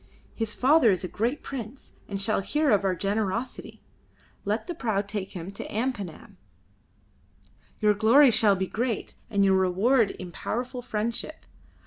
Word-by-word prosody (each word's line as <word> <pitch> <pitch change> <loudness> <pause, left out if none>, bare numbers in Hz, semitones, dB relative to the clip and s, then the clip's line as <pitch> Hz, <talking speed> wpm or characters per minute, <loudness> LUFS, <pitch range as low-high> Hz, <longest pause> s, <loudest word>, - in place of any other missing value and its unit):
His 225 -1 -2
father 270 -1 +5
is 190 -2 +1
a - - -2
great 235 - -2
prince, 260 -1 -7 0.2
and 200 -1 -4
shall 205 +1 +1
hear 295 +7 +1
of 205 -2 +3
our 190 -1 +1
generosity. 205 +5 -3 0.6
Let 210 +3 -1
the 350 - -4
prau 220 -10 -1
take 200 -1 -5
him 180 +2 -6
to 200 - -7
Ampanam. 215 -7 -4 1.4
Your 210 -1 +5
glory 235 +7 +6
shall 215 -2 +4
be 190 0 -1
great, 230 +2 -3 0.2
and 200 -1 +2
your 190 -1 +4
reward 200 +5 +3
in 185 -2 -8
powerful 250 +6 -4
friendship. 235 +6 -4
215 Hz, 150 wpm, -26 LUFS, 195-245 Hz, 1.4 s, glory